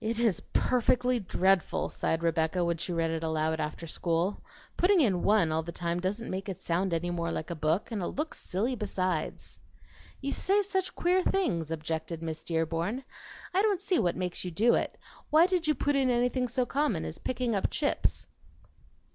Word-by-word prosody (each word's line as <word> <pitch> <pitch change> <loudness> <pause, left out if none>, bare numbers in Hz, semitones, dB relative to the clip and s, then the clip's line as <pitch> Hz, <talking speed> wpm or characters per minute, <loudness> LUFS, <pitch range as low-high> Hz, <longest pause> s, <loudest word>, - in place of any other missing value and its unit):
"It 225 +1 -1
is 230 -7 +2
perfectly 250 0 +2
dreadful," 190 -2 +1
sighed 165 +1 -1
Rebecca 165 +1 +1
when 170 -1 0
she 175 - -4
read 165 -1 0
it 165 -1 -2
aloud 160 0 0
after 155 +2 -3
school. 170 +4 -1 0.3
"Putting 375 +1 +4
in 200 - +3
'one' 205 -6 +3
all 160 +1 +1
the 170 +1 -6
time 170 0 -2
doesn't 200 +6 -2
make 190 +2 -4
it 190 -1 -5
sound 185 +1 0
any 170 +1 0
more 170 -1 -2
like 160 - -4
a - - -2
book, 160 +9 0
and 215 -3 -2
it 175 - -1
looks 305 +3 -4
silly 220 +8 -1
besides." 185 -6 -3 0.6
"You 280 0 -2
say 405 +2 +2
such 380 -1 -2
queer 360 +2 +3
things," 180 - 0
objected 160 +1 -3
Miss 160 -1 -4
Dearborn. 165 - -1 0.5
"I 380 - +4
don't 410 -3 +2
see 375 -2 +1
what 175 -1 +1
makes 180 -1 -2
you 180 - -3
do 220 +8 +3
it. - - 0 0.3
Why 315 +3 +6
did 360 -3 0
you 305 - +3
put 290 0 +1
in 270 -2 +3
anything 250 +1 +1
so 245 +1 0
common 280 - 0
as 80 - -6
picking 250 -2 -1
up 195 - +1
chips?" 290 -2 0
190 Hz, 190 wpm, -29 LUFS, 165-255 Hz, 0.6 s, Why